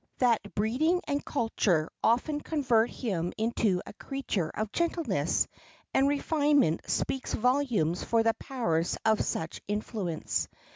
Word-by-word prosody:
That 240 -3 +3
breeding 260 - +2
and 285 -1 -1
culture 200 - +1 0.2
often 290 +6 +2
convert 245 -8 +2
him 180 -8 -2
into 220 -4 +1
a - - -9
creature 210 - -3
of 215 -1 -2
gentleness 340 -1 0 0.5
and 270 - +4
refinement 290 - +2
speaks 265 - -1
volumes 240 - +1
for 230 -1 +2
the 225 0 +3
powers 175 -13 -1
of 220 -1 +3
such 160 0 -3
influence. 205 -5 -2
230 Hz, 125 wpm, -29 LUFS, 195-275 Hz, 0.5 s, and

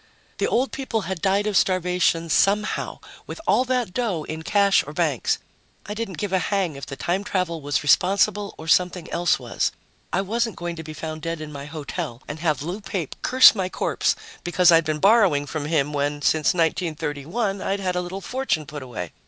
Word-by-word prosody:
The - - +2
old 255 +3 +1
people 260 -5 -2
had 190 -2 -4
died 200 +1 +2
of 210 -2 -1
starvation 180 -3 +2
somehow 210 +5 +1 0.3
with - - -7
all 255 - +3
that 250 -7 -1
dough 200 -10 -1
in 160 +1 -6
cash 200 +3 +3
or 150 - -7
banks. 155 -6 +1 0.5
I 205 - -5
didn't 210 -4 -5
give 205 -2 -3
a 190 - +4
hang 185 -5 -1
if 140 - -8
the 135 - -6
time 175 +9 -1
travel 180 -5 -2
was 145 0 -1
responsible, 200 +6 +2
or 160 - -9
something 180 0 +2
else 175 0 +2
was. - - -1 0.4
I - - +1
wasn't 225 +2 -1
going 175 0 -4
to 160 - -6
be 155 0 -8
found 155 0 -6
dead 165 0 -3
in 155 -1 -7
my 140 -1 -7
hotel 150 -3 -6
and 150 +2 -6
have 155 -3 0
Lou 180 +7 -4
Pape 190 -6 -4
curse 260 0 +7
my 190 -4 -2
corpse - - 0 0.3
because 175 0 +4
I'd 165 -1 +5
been 155 0 -1
borrowing 195 -6 +4
from 145 0 -4
him 150 -2 0
when, 145 0 -1
since 160 +3 +3
1931, 165 - -1
I'd 195 +1 -1
had 185 -2 -1
a 180 - +1
little 180 +2 -6
fortune 250 - -1
put 145 0 -7
away. 110 -10 -6
175 Hz, 200 wpm, -23 LUFS, 155-200 Hz, 0.5 s, curse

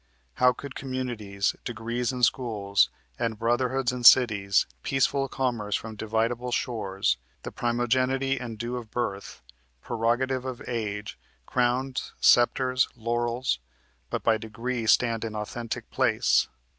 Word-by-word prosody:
How 125 0 +7
could 140 +2 -8
communities, 120 -8 -2
Degrees 120 +1 -2
in 125 -1 -5
schools, 105 -6 +2 0.3
and 115 -2 -1
brotherhoods 120 +3 +1
in 125 -1 -5
cities, 105 -6 +6 0.2
Peaceful 135 - +1
commerce 120 -7 -1
from 110 -1 -5
dividable 115 +3 -1
shores, 100 - 0 0.3
The - - -6
primogenity 130 +3 0
and 115 -3 -6
due 120 +2 -3
of 115 -3 -8
birth, 100 - -4 0.4
Prerogative 120 - 0
of 130 -2 -5
age, 105 -3 -4 0.3
crowns, 125 - -1
scepters, 125 +1 +4
laurels, 120 - -1 0.5
But - - -3
by 110 -1 +3
degree 115 +1 -4
stand 115 0 +3
in 110 -1 -4
authentic 110 +2 -5
place? - - +3
120 Hz, 120 wpm, -27 LUFS, 110-125 Hz, 0.5 s, How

